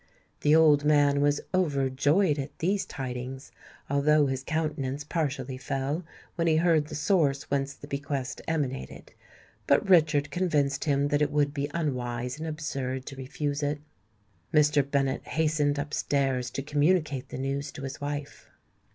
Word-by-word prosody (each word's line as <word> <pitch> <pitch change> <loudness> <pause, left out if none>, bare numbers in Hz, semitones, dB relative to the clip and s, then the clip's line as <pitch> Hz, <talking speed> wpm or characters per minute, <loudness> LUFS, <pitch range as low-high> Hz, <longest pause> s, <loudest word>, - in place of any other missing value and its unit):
The 150 +1 +4
old 150 -3 +6
man 145 -1 +4
was 145 0 +2
overjoyed 145 0 +2
at 140 +1 -6
these 195 +4 0
tidings, 130 0 -6 0.4
although 145 +2 +3
his 135 -1 -2
countenance 150 -3 -2
partially 140 -5 -3
fell 135 +5 -2 0.3
when 170 -1 -1
he 160 - +4
heard 160 -3 +3
the - - -7
source 145 -4 +2
whence 140 0 0
the - - -11
bequest 140 -2 -4
emanated; 140 - -3 0.5
but - - +3
Richard 155 -5 +4
convinced 145 -6 0
him 140 -1 +2
that 145 0 +1
it 150 - +3
would 145 -1 +1
be 145 0 -2
unwise 125 -4 -2
and 160 - -4
absurd 135 -4 -3
to 135 - -7
refuse 140 +2 -3
it. 145 0 -1 0.7
Mr. 150 -1 +4
Bennet 140 -1 -1
hastened 150 -2 +1
up 145 +1 -4
stairs 135 -3 0
to 135 - -4
communicate 150 -2 +1
the - - -6
news 140 +1 -3
to 140 - -8
his 135 0 -6
wife. 145 0 -5
145 Hz, 150 wpm, -28 LUFS, 135-150 Hz, 0.7 s, old